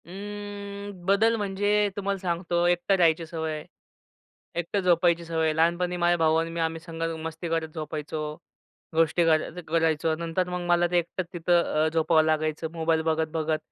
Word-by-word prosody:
अं, 205 +1 -7
बदल 210 +4 +4
म्हणजे 205 0 +1
तुम्हाला 200 -1 -1
सांगतो 175 -1 0
एकटा 175 +3 +2
राहायची 165 -2 +3
सवय 160 -1 -3
आहे. 150 - -7 0.9
एकटं 175 +4 -1
झोपायची 170 -1 +3
सवय 160 -1 -1
आहे. 155 -1 +1
लहानपणी 175 +2 +1
माझा 175 0 +3
भाऊ 160 -1 +3
आणि 165 0 +1
मी 170 - -4
आम्ही 165 0 -1
संघ 165 0 -8 0.2
मस्ती 165 +1 -5
करत 165 -1 0
झोपायचो. 155 0 -4 0.7
गोष्टी 165 +1 +3
कराय 165 +2 +1
करायचो. 160 0 +1
नंतर 170 +2 -2
मग 180 0 -3
मला 175 0 +4
ते 175 - +3
एकटंच 175 +1 -4
तिथं 170 -2 +2
अ, - - +3
झोपावं 160 0 +4
लागायचं 155 0 0
मोबाईल 165 -1 +1
बघत-बघत. 160 0 0
170 Hz, 160 wpm, -26 LUFS, 160-180 Hz, 0.9 s, बदल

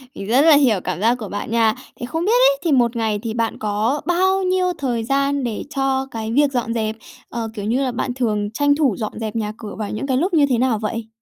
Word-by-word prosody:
mình 195 - -7
rất 250 +5 +4
là 310 -1 +7
hiểu 245 -9 +4
cảm 180 -1 -3
giác 235 +3 +3
của 215 -5 -7
bạn 205 +2 -5
nha. 225 -1 +3 0.2
Thế 240 - -4
không 325 +7 -3
biết 425 - +2 0.2
ấy, - - -4
thì 330 - +1
một 240 -3 +3
ngày 220 -2 0
thì 225 -1 -3
bạn 230 -1 -1
có 215 +7 0
bao 375 +2 +2
nhiêu 365 -1 +1
thời 245 -5 -1
gian 275 +2 0
để 230 -3 -3
cho 270 0 0
cái 225 -1 -4
việc 285 +2 +3
dọn 235 -3 -1
dẹp? 220 -1 -1 0.3
Ờ, 230 -2 -4
kiểu 205 -2 -5
như 245 +5 +1
là, 255 - -1
bạn 245 +1 -2
thường 215 -5 -1
tranh 285 +3 +2
thủ 280 -9 +2
dọn 215 -1 -5
dẹp 220 -1 -4
nhà 215 -2 -2
cửa 210 -3 -8
vào 210 - -3
những 215 +6 -4
cái 260 -1 +1
lúc 355 +5 0
như 295 -3 +5
thế 245 - +2
nào 240 -3 +1
vậy? 225 +1 -4
240 Hz, 260 wpm, -20 LUFS, 220-280 Hz, 0.3 s, là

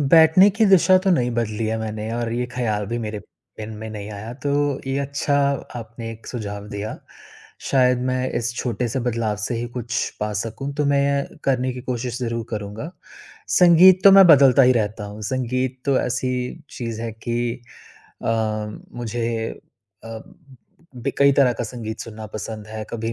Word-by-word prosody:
बैठने 165 +4 +7
की 220 +3 +2
दिशा 190 -1 +6
तो 190 +1 0
नहीं 125 -9 +2
बदली 115 -2 -2
है 110 +1 -1
मैंने 110 0 -4
और 115 -1 -2
ये 125 +1 -1
ख़्याल 110 -5 -1
भी 120 +3 -3
मेरे 110 -2 -4 0.4
मन 110 0 -6
में 110 +1 -6
नहीं 105 -1 -7
आया, 105 +3 -7
तो 145 +1 -1
ये 135 +1 -1
अच्छा 140 +1 -1 0.4
आपने 115 0 -7
एक 115 0 -11
सुझाव 105 -4 -6
दिया। 105 +1 -5 0.7
शायद 125 -2 +4
मैं 130 0 -1
इस 120 0 -3
छोटे 120 0 -2
से 120 +4 -2
बदलाव 115 -3 -1
से 105 +3 -2
ही 120 - -3
कुछ 120 -1 -2
पा 105 0 -1
सकूँ, 115 +6 -5
तो 150 0 0
मैं 140 0 +1
करने 130 -1 +1
की 125 - -7
कोशिश 125 -1 -3
ज़रूर 115 -2 -3
करूँगा। 105 +7 -5 0.6
संगीत 180 +1 +7
तो 200 - +10
मैं 195 -1 +9
बदलता 140 -5 +7
ही 130 0 +6
रहता 105 -2 -1
हूँ, 105 +1 -9
संगीत 130 +2 -2
तो 140 -2 +2
ऐसी 125 +4 -2
चीज़ 115 -2 -5
है 115 -1 -4
कि 120 +2 -3 0.6
अ, - - -3 0.7
मुझे 115 -1 -2 0.6
अ, - - -9 0.9
ब 125 +3 -2
कई 140 0 +6
तरह 135 -2 +4
का 120 - -4
संगीत 110 -1 -6
सुनना 110 -1 -8
पसंद 110 0 -6
है, 110 0 -6
कभी 115 0 -3
120 Hz, 175 wpm, -22 LUFS, 110-135 Hz, 0.9 s, तो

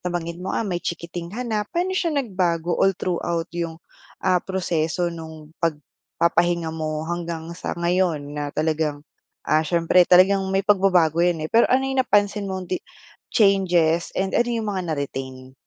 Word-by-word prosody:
nabanggit 175 -1 -4
mo, 185 - -5
ah, 230 - 0
may 175 -3 -2
chikiting 170 0 -5
ka 240 +7 -5
na. 220 -3 -1
Pa'no 360 +2 -1
siya 350 -2 0
nagbago 180 - 0
all 195 +1 +2
throughout 170 -1 -2
'yung, 170 -1 -3 0.5
ah, 180 -1 +3
proseso 175 -2 -1
nung 160 -2 -10
pagpapahinga 170 +1 -1
mo 155 -1 -3
hanggang 170 -1 -4
sa 170 - -5
ngayon 170 -4 0
na 145 0 -3
talagang, 155 -1 -1 0.4
ah, 155 - +3
siyempre 170 +2 +3
talagang 190 +2 +6
may 195 +1 0
pagbabago 185 -5 +3
'yan 170 -3 +1
eh. - - -3
Pero 230 - +5
ano 265 +1 +3
'yung 270 0 +1
napansin 205 -4 +1
mong 190 -1 -4
di 185 - -1 0.5
changes 180 -6 +3
and 190 0 -1
ano 240 - +2
'yung 230 -2 -2
mga 190 -1 -2
na-retain? 130 -3 -5
175 Hz, 160 wpm, -23 LUFS, 160-190 Hz, 0.5 s, talagang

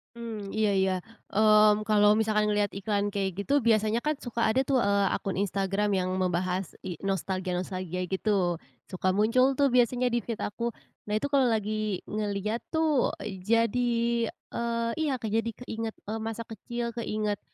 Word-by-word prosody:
Mmm, 220 -4 -6
iya 215 -1 +1
iya. 190 0 +2 0.4
Mmm, 215 0 +5
kalau 210 -1 +5
misalkan 215 -1 +2
ngelihat 205 0 +2
iklan 205 0 0
kayak 195 -1 -1
gitu, 280 +6 +1
biasanya 220 0 +2
kan, 300 - +1
suka 235 -1 -3
ada 220 +4 +3
tuh, 275 - +2
eee, 200 0 +3
akun 195 -1 -3
Instagram 195 +1 0
yang 185 -1 0
membahas 185 0 -1
i 175 -4 -5
nostalgia-nostalgia 185 -1 -2
gitu. 190 -4 +1 0.3
Suka 185 0 0
muncul 255 +6 +3
tuh 280 0 +3
biasanya 245 0 +3
di 240 - +2
feed 230 -1 -4
aku. 235 +3 -2 0.4
Nah, 210 - 0
itu, 215 +7 0
kalau 275 -3 +4
lagi 215 -3 -1
ngelihat, 210 +1 -1 0.2
tuh, 315 -4 +2
jadi, 230 +3 +1 0.2
eee 235 0 -1
iya, 300 -4 +1
Kak, 225 -4 -4
jadi 225 +1 +1 0.2
keingat, 225 -2 -4
eee, 220 +2 -4
masa 225 +1 -4
kecil, 235 +1 -5
keingat 215 -3 -2
215 Hz, 155 wpm, -28 LUFS, 195-235 Hz, 0.4 s, Mmm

